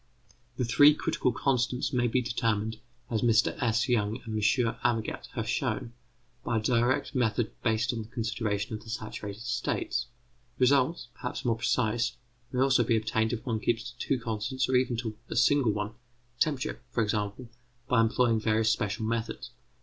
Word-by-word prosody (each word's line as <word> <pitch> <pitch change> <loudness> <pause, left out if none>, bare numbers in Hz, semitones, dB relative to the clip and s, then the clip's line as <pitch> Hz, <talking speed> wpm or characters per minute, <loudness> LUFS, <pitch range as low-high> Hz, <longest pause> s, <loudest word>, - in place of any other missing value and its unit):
The 125 - 0
three 145 +5 +6
critical 155 -5 0
constants 125 +1 0
may 120 -1 +2
be 125 +2 +1
determined, 110 -2 -1 0.3
as 110 -2 +1
Mr 115 -1 +3
S. 115 +2 +2
Young 110 -2 +1
and 110 - -5
M. - - 0 0.4
Amagat 115 -3 -1
have - - -3
shown, 120 - -1 0.5
by 115 - 0
a - - +3
direct 120 +5 +1
method 120 -3 +1
based 115 +2 +1
on 115 - -3
the 110 - -8
consideration 110 -3 -2
of 110 0 -5
the 110 - -12
saturated 110 -2 -6
states. 125 0 -1 0.5
Results, 130 +1 +2
perhaps 125 - -5
more 115 -2 +2
precise, 115 0 0 0.3
may 125 - 0
also 135 -1 +4
be 115 - +2
obtained 110 0 0
if 115 - -4
one 115 -4 -1
keeps 120 +2 -1
to 125 - -22
two 135 - 0
constants 115 +3 -2
or 130 - +1
even 125 -2 +2
to 110 -2 -4
a - - -4
single 125 -1 +4
one 105 0 -3 0.5
temperature, 145 -3 0
for 120 -2 +1
example 105 +3 -2 0.4
by 125 -3 +4
employing 115 0 +3
various 110 0 +2
special 105 0 -1
methods. 115 0 -3
115 Hz, 170 wpm, -29 LUFS, 110-125 Hz, 0.5 s, three